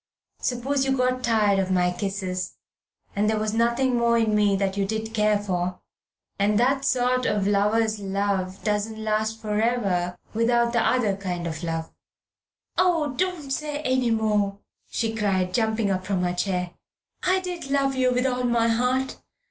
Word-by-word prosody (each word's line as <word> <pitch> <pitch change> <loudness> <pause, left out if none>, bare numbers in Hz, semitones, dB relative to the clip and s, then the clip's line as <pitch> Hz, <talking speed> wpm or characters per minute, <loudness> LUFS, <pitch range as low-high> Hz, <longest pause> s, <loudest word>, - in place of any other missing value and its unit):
Suppose 265 +3 0
you 265 0 +1
got 255 0 +1
tired 210 -4 +3
of 190 -1 0
my 180 -1 +2
kisses, 185 0 -3 0.6
and 210 +1 +2
there 220 - +1
was 215 0 -1
nothing 235 +3 +2
more 235 0 +3
in 225 -2 +2
me 205 -1 +3
that 195 0 -1
you 200 - 0
did 220 +2 -3
care 210 -1 +3
for. 180 -3 -2 0.6
And 205 +1 +2
that 270 +3 +2
sort 255 -1 +2
of... 205 -2 0
lover's 210 +2 +2
love 195 -1 -2
doesn't 210 +1 -1
last 220 0 -1
for 210 -1 -1
ever 190 -7 0 0.2
without 235 +1 +2
the 235 - +3
other 220 -6 +2
kind 180 -3 -4
of 160 -1 -4
love 165 -1 -4 0.4
" - - -46
"Oh, 335 -5 +2
don't 350 -5 -2
say 295 +1 -2
any 255 -2 +1
more," 210 -3 +1 0.3
she 225 -1 -1
cried, 190 -4 0
jumping 220 -3 +1
up 185 -1 -1
from 185 -1 -1
her 180 0 0
chair. 180 -1 -1 0.5
"I 370 +1 +2
did 355 -6 -6
love 275 -1 +2
you 255 -1 +2
with 250 +1 +1
all 250 -1 0
my 235 -1 +2
heart. 250 +3 0
220 Hz, 170 wpm, -25 LUFS, 195-250 Hz, 0.6 s, tired